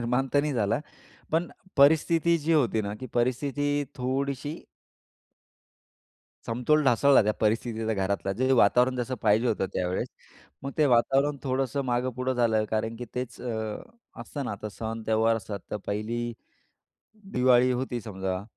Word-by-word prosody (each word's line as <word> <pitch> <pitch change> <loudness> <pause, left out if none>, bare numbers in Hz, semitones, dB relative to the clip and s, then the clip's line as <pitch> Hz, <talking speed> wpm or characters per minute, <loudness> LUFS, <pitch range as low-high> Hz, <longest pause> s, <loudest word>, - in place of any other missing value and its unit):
निर्माण 125 +3 0
तर 145 - +6
नाही 150 - -1
झाला. 115 +1 0 0.5
पण 165 +2 +2 0.3
परिस्थिती 160 +4 +4
जी 160 +2 0
होती 120 -8 +2
ना 100 0 -4
की 130 - -5
परिस्थिती 145 +4 0
थोडीशी 140 +4 -3 1.9
समतोल 125 +7 +2
ढासळला 135 +1 +5
त्या 105 - +1
परिस्थितीचा 110 0 0
घरातला. 95 0 -1
जे 130 +6 +1
वातावरण 125 +2 +4
जसं 125 +1 -2
पाहिजे 110 +3 +3
होतं 100 -3 0
त्यावेळेस. 90 0 -1 0.5
मग 140 - -4
ते 150 - +5
वातावरण 135 +4 +3
थोडंसं 135 +1 -1
मागं 125 +1 0
पुढं 130 +1 -1
झालं 115 -3 +2
कारण 110 +1 -1
की 125 - -6
तेच 125 -1 -5
अ, - - -9 0.8
असतं 135 +4 -5
ना - - -3
आता 105 +1 -6
सण-त्यौहार 110 +1 0
असतात 105 -2 -5
तर - - -1
पहिली 110 +3 -2 1.1
दिवाळी 125 0 +4
होती 125 -1 -2
समजा, 95 -3 -4
125 Hz, 140 wpm, -27 LUFS, 110-135 Hz, 1.9 s, तर